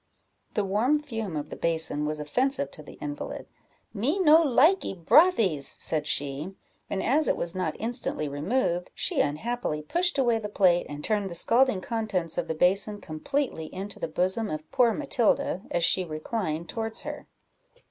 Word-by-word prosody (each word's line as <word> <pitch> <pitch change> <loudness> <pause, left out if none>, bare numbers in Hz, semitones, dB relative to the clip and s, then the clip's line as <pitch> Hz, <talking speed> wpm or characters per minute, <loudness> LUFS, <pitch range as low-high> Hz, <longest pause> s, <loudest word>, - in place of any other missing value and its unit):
The 210 - 0
warm 230 +10 +1
fume 225 - -5
of 150 0 -4
the - - -5
basin 160 -3 +1
was 155 0 -3
offensive 245 - 0
to - - -9
the 150 - -12
invalid 145 -1 -6 0.5
"Me 250 - -1
no 325 -3 +6
likee 305 - +3
brothies," 200 - +4
said 155 -2 -1
she; 145 +7 -2 0.3
and 190 - -2
as 295 +5 +4
it - - +1
was 170 +1 +2
not 180 -5 -2
instantly 230 - 0
removed, 175 - -1
she - - +1
unhappily 155 +1 -3
pushed 350 - +1
away 240 -4 +2
the 210 -1 -6
plate, 180 -4 +2
and 145 0 -7
turned 205 -3 0
the 170 - -6
scalding 230 +3 +3
contents 200 -7 -2
of - - -3
the 160 - -3
basin 200 +5 +2
completely 160 - -3
into 195 +2 -6
the - - -3
bosom 185 +7 -1
of 155 0 -6
poor 240 -2 +3
Matilda, 240 - 0
as 170 - -1
she 185 +2 +4
reclined 165 0 -4
towards 225 +5 -4
her. - - -8
195 Hz, 170 wpm, -26 LUFS, 155-240 Hz, 0.5 s, no